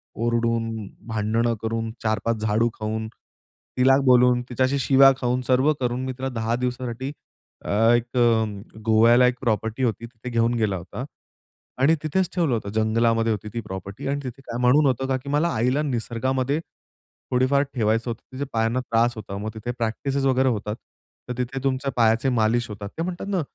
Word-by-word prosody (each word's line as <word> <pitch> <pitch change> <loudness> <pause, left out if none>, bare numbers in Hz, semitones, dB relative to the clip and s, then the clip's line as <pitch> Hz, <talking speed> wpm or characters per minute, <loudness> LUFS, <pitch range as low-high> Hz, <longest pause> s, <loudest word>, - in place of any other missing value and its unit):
ओरडून, 115 -2 -1 0.2
भांडणं 110 +1 0
करून, 115 0 -2
4-5 110 +1 0
झाडू 110 +2 +2
खाऊन, 110 +1 -3 0.7
तिला 130 +1 +5
बोलून, 125 -1 +5
तिच्याशी 130 +3 +1
शिव्या 135 0 +6
खाऊन, 125 0 0
सर्व 130 +4 +4
करून, 125 0 -1
मी 130 - -2
तिला 135 0 -3
10 115 -2 -1
दिवसासाठी 125 +1 -3 0.5
अ, - - -5 0.3
एक 120 +2 -2
अ, 110 -3 +1
गोव्याला 115 +3 +5
एक 125 0 -1
प्रॉपर्टी 110 0 -1
होती 115 -1 -1
तिथे 115 +1 -9
घेऊन 115 0 +1
गेला 110 -4 0
होता. 95 +7 -6 0.8
आणि 155 +5 +5
तिथेच 180 +4 0
ठेवलं 165 -8 +1
होतं. 110 -3 -2
जंगलामध्ये 115 +1 +2
होती 105 0 -3
ती 120 - -2
प्रॉपर्टी 95 +2 -7
आणि 140 +1 -1
तिथे 130 +1 -7
काय 120 -3 -6
म्हणून 130 +5 +5
होतं 130 -1 +1
का 130 -1 +1
की 135 +2 -9
मला 150 +4 +2
आईला 125 +6 +1
निसर्गामध्ये 130 +1 -1 0.7
थोडीफार 130 +3 +3
ठेवायचं 115 -1 0
होतं. 115 - -5
तिथे 135 +2 -3
पायांना 115 +2 +1
त्रास 120 -1 +1
होता, 105 -3 -7
मग 105 +2 -4
तिथे 110 +2 -4
प्रॅक्टिसेस 135 +5 -2
वगैरे 130 0 +3
होतात. 105 -2 -2 0.5
तर - - -1
तिथे 125 +2 -3
तुमच्या 135 0 0
पायाचे 115 +2 +3
मालिश 120 0 +1
होतात. 100 -1 -7
ते 165 - -1
म्हणतात 180 +2 -5
ना, 190 -3 +1
120 Hz, 170 wpm, -24 LUFS, 110-130 Hz, 0.8 s, शिव्या